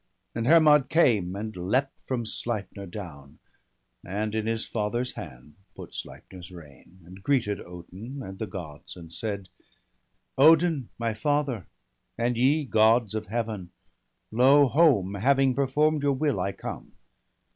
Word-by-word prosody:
And 115 +1 -2
Hermod 150 -4 +6
came, 110 - +2
and 110 +2 -5
leapt 115 +10 -2
from 125 -3 -2
Sleipner 105 -3 -4
down. 80 -8 -10 0.7
And 105 +3 -3
in 110 0 -2
his 115 0 -1
father's 120 +3 -2
hand 65 +4 -10 0.2
put - - -10
Sleipner's 90 -1 -9
rein. 85 +2 -15
And 95 +3 -13
greeted 110 -5 0
Odin 95 +10 -9
and 95 0 -9
the 110 - -3
Gods, 80 -6 -9
and 85 -1 -11
said: 100 +1 -4 0.3
— - - -46
' - - -49
Odin, 160 -6 +2
my 115 -1 -1
father, 135 - -1 0.5
and 120 +1 0
ye, 140 +6 +2
Gods 110 -2 +3
of 110 -1 -4
Heaven! 110 -5 -3 0.6
Lo, 135 +5 +5
home, 130 - +3
having 135 +5 +2
perform'd 145 +3 +1
your 140 -1 +2
will, 145 +1 0
I 100 - -1
come. - - -8
110 Hz, 145 wpm, -26 LUFS, 95-135 Hz, 0.7 s, Hermod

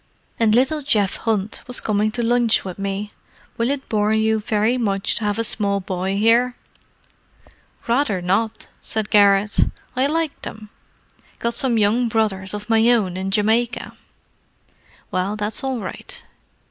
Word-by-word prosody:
"And 220 -2 +4
little 270 +5 +2
Geoff 210 -8 +1
Hunt 215 -2 -2
was 250 - +1
coming 210 0 +1
to 240 -1 -1
lunch 235 -2 +2
with 185 0 -6
me. 200 +1 -3 0.4
Will 230 +2 0
it 280 -1 -3
bore 210 -1 +1
you 220 0 +2
very 215 +2 +1
much 200 -5 0
to 220 - -3
have 205 0 0
a 230 - 0
small 200 -2 -1
boy 190 +1 -2
here?" 235 +4 +3 1.3
"Rather 235 -5 +1
not!" 195 +5 -1
said 215 -2 -2
Garrett. 200 0 +4 0.4
"I 260 +2 +2
like 320 0 -2
them—got 220 +2 -8
some 250 -3 +1
young 220 +4 +2
brothers 210 -4 -1
of 210 0 -7
my 225 0 +4
own 210 -7 +2
in 190 +1 -3
Jamaica." 220 +4 0 1.2
"Well, 185 +3 -1
that's 215 +5 -1
all 265 -2 -1
right. 190 - -7
215 Hz, 145 wpm, -21 LUFS, 200-235 Hz, 1.3 s, And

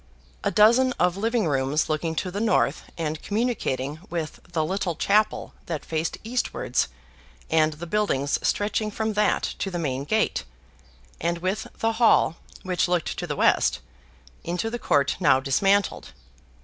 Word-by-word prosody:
A - - +2
dozen 235 +5 +5
of 180 -3 +1
living 225 +1 0
rooms 140 +1 +1
looking 160 +1 -1
to 180 - -2
the 200 - -3
north, 225 - +1
and 155 -2 -3
communicating 195 - -1
with 165 -3 -4
the 160 -2 0
little 185 0 -2
chapel 210 +5 +1
that 160 -4 -4
faced 160 0 -2
eastwards 245 +3 -1 0.6
and 155 -1 +3
the 160 +3 -8
buildings 165 -8 0
stretching 215 +1 0
from 220 +1 -2
that 210 +1 +2 0.2
to 195 - -1
the 180 - -4
main 140 -4 -2
gate, 220 - +1 0.8
and 170 +1 0
with 185 +5 -2
the 225 - +1
hall 220 -7 +5 0.3
(which 185 -1 0
looked 175 -2 0
to - - -4
the - - -2
west) 65 - +3 0.7
into 175 +6 -2
the 240 - -3
court 140 - +2
now 130 - +5
dismantled. 195 +10 +1
175 Hz, 150 wpm, -25 LUFS, 155-210 Hz, 0.8 s, dozen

